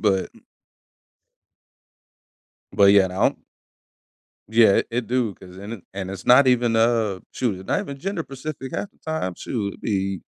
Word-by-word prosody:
But 95 -3 +1
m - - -20 2.3
but 100 0 +5
yeah, 100 -2 +6
I - - -2
don't 90 - +1 1.1
Yeah, 110 -2 +6
it - - 0
it 120 0 -2
do 120 -4 0
'cause 90 -1 -14
and 100 +1 -8
and 95 -1 -5
it's 95 -1 -8
not 130 +2 +7
even, 120 -2 +3
uh, 115 -4 +2
shoot, 105 -7 -2
it's 95 - -12
not - - +1
even 140 -1 -6
gender-specific 150 -6 -5
half 205 - -4
the - - -33
time, 160 - -3
shoot, 100 -5 -3
it - - -23
be 95 -3 -1
115 Hz, 165 wpm, -23 LUFS, 95-125 Hz, 2.3 s, not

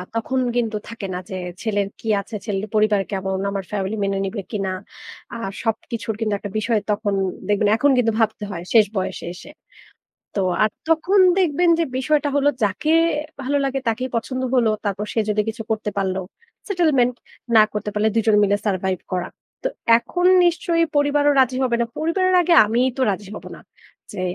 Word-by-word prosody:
তখন 260 +3 -1 0.2
কিন্তু 225 -3 0
থাকে 225 -4 -6
না 180 - -3
যে, 190 - -5 0.3
ছেলের 205 -3 0
কি 225 - -9
আছে, 215 +2 -9
ছেলের 205 0 -2
পরিবার 210 -2 +3
কেমন, 190 -1 -2
আমার 200 -1 -3
ফ্যামিলি 200 +1 -2
মেনে 195 0 0
নিবে 200 +1 -4
কিনা? 195 -3 -2 0.6
আর 230 -4 -4
সবকিছুর 225 -1 -3
কিন্তু 215 -2 -1
একটা 205 -1 -7
বিষয় 220 0 +1
তখন 205 -1 -1 0.3
দেখবেন 205 0 +2
এখন 285 +3 +3
কিন্তু 230 -2 +3
ভাবতে 220 -1 0
হয় 170 -2 -5
শেষ 220 -2 +7
বয়সে 185 - -3
এসে। 290 - -12 0.8
তো 200 - +1 0.2
আর 215 - +3 0.2
তখন 345 +5 +3 0.2
দেখবেন 345 0 +2
যে - - +3
বিষয়টা 295 +2 +1
হলো 285 0 +4
যাকে 210 +11 0 0.5
ভালো 285 +2 0
লাগে, 270 0 -1
তাকেই 250 +3 -1
পছন্দ 255 +3 -2
হলো। 235 -3 +3 0.2
তারপর 205 +1 -2
সে 225 - +1
যদি 210 0 +2
কিছু 225 +1 -6
করতে 215 -1 -1
পারলো 190 -1 -1 0.5
settlement। 295 - +2 0.4
না 215 - +9
করতে 210 0 -3
পারলে, 210 +1 +1
২ 225 - +2
জন 215 - +5
মিলে 205 0 +2
survive 190 -2 -1
করা। 180 -1 -1 0.4
তো - - +1 0.3
এখন 355 +9 -2 0.2
নিশ্চয়ই 340 -1 +2
পরিবারও 290 0 +3
রাজি 255 0 +3
হবে 240 -2 +1
না। - - +1
পরিবারের 370 +4 +1
আগে 345 0 +3
আমিই 240 +4 +2
তো - - -1
রাজি 195 0 -6
হবো - - -9
না। - - -13 0.5
যে 185 - -5
225 Hz, 180 wpm, -21 LUFS, 205-270 Hz, 0.8 s, না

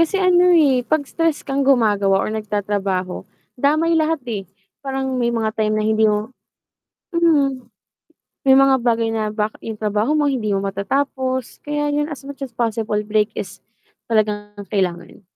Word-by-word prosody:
kasi 335 +4 +2
ano, 360 -1 +4
eh, 275 -5 +4
'pag 285 +4 0
stress 330 +1 -1
kang 275 0 -1
gumagawa 210 -8 +3
or - - -3
nagtatrabaho, 205 -3 -2 0.2
damay 310 +6 +1
lahat, 320 -1 +1
eh, 220 -5 -4 0.4
parang 265 -2 -2
may 235 - +1
mga 225 -2 -1
time 215 0 +1
na 215 - 0
hindi 220 0 +3
mo 210 +3 -1 0.8
hmm. 285 -6 +2 0.8
May 265 -1 +5
mga 270 0 +5
bagay 230 -1 +1
na 220 -1 -1
bakit 210 0 -2
'yung 220 -1 -6
trabaho 215 +7 0
mo 295 - +2
hindi 230 -5 -2
mo 195 - -1
matatapos, 260 +6 -2
kaya 295 0 -2
'yun 295 0 0
as 280 -2 -8
much 280 0 -9
as 255 -4 -6
possible 225 -2 -1
break 210 0 +1
is 190 - -6 0.5
talagang 210 -2 0 0.2
kailangan. 180 -3 -2
235 Hz, 160 wpm, -20 LUFS, 210-280 Hz, 0.8 s, May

